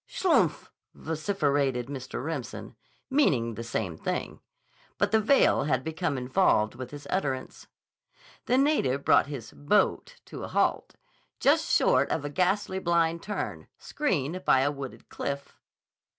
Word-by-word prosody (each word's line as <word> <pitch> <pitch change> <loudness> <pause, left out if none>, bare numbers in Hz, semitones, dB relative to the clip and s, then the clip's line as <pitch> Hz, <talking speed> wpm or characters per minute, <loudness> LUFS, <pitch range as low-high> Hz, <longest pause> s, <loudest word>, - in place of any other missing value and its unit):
"Schlupff!" 285 - +1 0.2
vociferated 145 -6 -1
Mr. 130 -1 -6
Remsen, 150 -6 -5 0.4
meaning 130 - +2
the 115 - -6
same 110 -7 -3
thing. - - -4 0.6
But 200 0 +1
the 220 0 +4
veil 220 - +4
had 130 -3 0
become 160 -3 -2
involved 125 - +2
with 125 0 -7
his 145 +1 -10
utterance. 135 -9 -3 0.8
The 250 - +3
native 260 - +2
brought - - +5
his 130 -6 -7
"boat" 70 0 +1
to - - -8
a - - -4
halt, - - 0 0.4
just - - +3
short - - +3
of 145 - -2
a 145 - -4
ghastly 190 +3 0
blind 170 -2 +1
turn, 210 - -5
screened 185 - -2
by 130 - +4
a 145 +2 +2
wooded 140 -2 -8
cliff. 140 0 -5
145 Hz, 135 wpm, -28 LUFS, 130-190 Hz, 0.8 s, brought